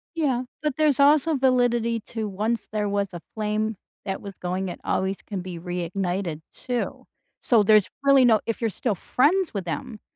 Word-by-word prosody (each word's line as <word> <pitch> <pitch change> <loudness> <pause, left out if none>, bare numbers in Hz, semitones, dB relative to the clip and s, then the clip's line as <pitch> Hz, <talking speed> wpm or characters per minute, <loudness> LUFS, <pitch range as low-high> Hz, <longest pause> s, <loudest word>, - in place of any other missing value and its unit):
Yeah, 270 -6 +1 0.2
but 300 -3 0
there's 300 -3 +3
also 300 +2 +5
validity 245 -3 +2
to 220 -2 -3
once 210 +3 -2
there 210 -1 0
was 200 -1 -1
a 175 - -7
flame 215 0 -1 0.3
that 195 - -3
was 200 -1 -8
going, 185 +1 -2
it 175 - -7
always 190 +1 0
can 200 -3 -5
be 180 -1 -7
reignited 175 -1 -3
too. 245 -1 -4 0.4
So, 230 -4 +4
there's 210 -1 +5
really 275 -2 +6
no 220 -3 +5
if 230 - -2
you're 225 -2 0
still 210 +3 -1
friends 335 - +2
with 195 - -2
them, 215 +6 -5
215 Hz, 175 wpm, -25 LUFS, 195-250 Hz, 0.4 s, really